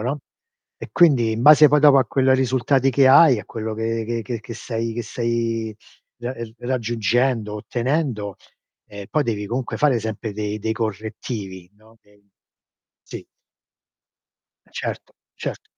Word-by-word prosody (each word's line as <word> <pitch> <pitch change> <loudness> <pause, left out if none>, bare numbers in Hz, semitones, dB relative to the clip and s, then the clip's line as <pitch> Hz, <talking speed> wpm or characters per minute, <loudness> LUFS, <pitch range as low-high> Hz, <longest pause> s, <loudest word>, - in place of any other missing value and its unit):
no, 130 +6 -3 0.6
e - - -8
quindi 130 -10 +4
in 115 +2 -3
base 150 +1 +8
poi 150 +1 +3
dopo 145 -2 +7
a 130 - +3
quel 130 +1 +2
risultati 130 +1 +1
che 135 +1 +4
hai, 135 -2 +7
a - - -13
quello 110 +1 -5
che 115 +1 -2
che 115 -1 -3
che 115 +1 -5
che 115 +1 -9
stai 115 0 -4
che 120 - -3
stai 115 -2 -2 0.4
ra 120 +2 -5
ehm, 115 -3 -8
raggiungendo, 120 -2 -1
ottenendo, 120 - -2 0.5
ehm, 100 -1 -9
poi 155 - +1
devi 105 -4 -3
comunque 125 +3 -3
fare 135 -6 +2
sempre 110 0 -5
dei 105 0 -4
dei 110 +1 -2
correttivi, 105 -3 -5
no, 110 +2 -22
dei 105 0 -28 0.8
sì. - - -9 1.4
Eh - - -27
certo, - - -6 0.2
cert - - -6
115 Hz, 150 wpm, -21 LUFS, 110-130 Hz, 1.4 s, base